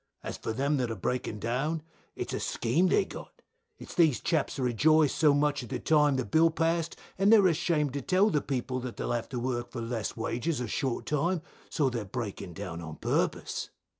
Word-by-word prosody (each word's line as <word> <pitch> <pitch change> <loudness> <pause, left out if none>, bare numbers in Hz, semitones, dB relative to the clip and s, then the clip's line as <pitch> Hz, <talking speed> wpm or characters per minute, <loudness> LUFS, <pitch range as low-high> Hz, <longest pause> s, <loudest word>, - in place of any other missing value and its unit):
As - - -4
for - - -4
them 140 +5 0
that 125 -3 0
are 115 - -3
breaking 110 +2 -2
down, 135 +9 -1 0.3
it's - - -4
a - - -1
scheme 135 +11 +1
they've 405 - +3
got, - - -11 0.3
it's - - -10
these 160 -7 +4
chaps 160 -4 0
that 135 - -2
rejoiced 150 +5 +4
so 150 -2 +5
much 145 0 +2
at 120 - -9
the - - -2
time 150 -3 +3
the 130 - -1
bill 165 +1 +4
passed, 165 0 0 0.2
and 195 +2 +5
they 225 - +9
are 200 - +5
ashamed 155 -4 +1
to 140 - -2
tell 195 +6 +3
the 150 - +2
people 130 -1 -2
that 125 -1 -6
they'll - - -2
have 120 -1 -2
to 125 - -3
work 120 -1 -2
for 120 - -5
less 115 -1 -3
wages 120 +6 -1
or 125 - -2
short 130 +2 -2
time, 165 +3 0 0.3
so 150 -4 +1
they 120 -2 -1
are - - -4
breaking 100 -4 -5
down 90 -3 -6
on 80 -2 -7
purpose. - - -1
140 Hz, 220 wpm, -29 LUFS, 120-160 Hz, 0.3 s, they